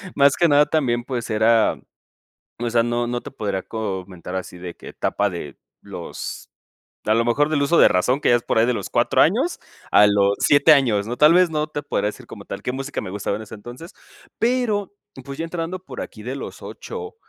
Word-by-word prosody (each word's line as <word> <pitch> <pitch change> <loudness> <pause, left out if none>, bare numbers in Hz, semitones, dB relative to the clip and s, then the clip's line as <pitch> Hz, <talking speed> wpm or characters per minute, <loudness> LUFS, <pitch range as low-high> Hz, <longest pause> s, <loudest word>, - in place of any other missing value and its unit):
Más 140 0 +4
que 170 - +4
nada 145 0 +5
también, 120 -6 0
pues 120 -3 -4
era, 110 +1 +3 0.8
o 120 - -1
sea, 115 0 +3
no 120 0 -1
no 120 0 -3
te - - -8
podría 100 -7 -3
comentar 95 -4 -6
así 90 -1 -6
de 85 -1 -8
que - - -11
etapa 100 0 -1
de, 75 -5 -7 0.2
los - - -8 0.6
a 110 - +3
lo 115 0 +2
mejor 145 +6 +2
del 150 -2 +1
uso 165 +4 +3
de - - +8
razón 125 +10 +1
que - - +1
ya 120 - +6
es 120 - -3
por - - 0
ahí 115 - +4
de 125 - +1
los - - -5
4 - - +3
años - - +1 0.3
a 105 - +7
los 100 -1 +3
7 145 +2 +5
años, 115 -8 +3
¿no? 120 +2 -4
Tal 150 +2 +6
vez 180 0 +5
no 155 -1 -1
te 150 -1 -5
podría 105 -7 -1
decir - - -9
como - - -11
tal - - -7
qué 125 - -2
música 135 +2 -4
me - - -7
gustaba 100 0 -2
en 110 - -7
ese 110 +1 -10
entonces, 120 - -11 0.4
pero, 230 -5 0 0.3
pues, 140 +1 -8
ya 165 - -2
entrando 165 +2 -4
por 185 - -8
aquí 105 - -10
de 130 +4 -5
los - - -8
8 450 -2 -8
120 Hz, 220 wpm, -22 LUFS, 105-150 Hz, 0.8 s, de